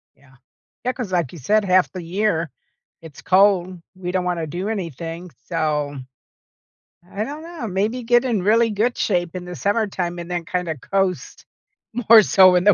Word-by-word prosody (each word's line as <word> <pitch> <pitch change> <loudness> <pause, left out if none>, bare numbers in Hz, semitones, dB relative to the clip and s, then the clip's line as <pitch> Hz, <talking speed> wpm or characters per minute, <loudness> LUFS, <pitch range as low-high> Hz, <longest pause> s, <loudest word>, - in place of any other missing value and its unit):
Yeah. 135 -1 -23 0.5
Yeah, 255 - 0
'cause 235 -8 -5
like 170 -8 0
you 170 - -9
said, 210 +10 +2
half 185 -1 +3
the 185 -2 -7
year, 170 -2 -1 0.5
it's 160 -4 -12
cold. 185 -2 +3
We 180 -1 -5
don't 185 -1 0
wanna 170 -3 -2
do 180 +7 -4
anything. 170 - -5
So, 150 -2 -1 1.1
I 205 +2 -3
dunno. 310 0 -7
Maybe 210 +6 -1
get 240 +2 +3
in 230 -6 0
really 225 +3 +3
good 225 +4 0
shape 175 -3 -1
in 180 -1 -5
the 180 0 -7
summertime 195 -4 -1
and 170 0 -7
then 175 -1 -3
kinda 175 -3 -3
coast 190 +6 -2 0.6
more 225 -1 +10
so 185 -2 +6
in 180 - +3
the 205 - +7
185 Hz, 170 wpm, -21 LUFS, 170-215 Hz, 1.1 s, more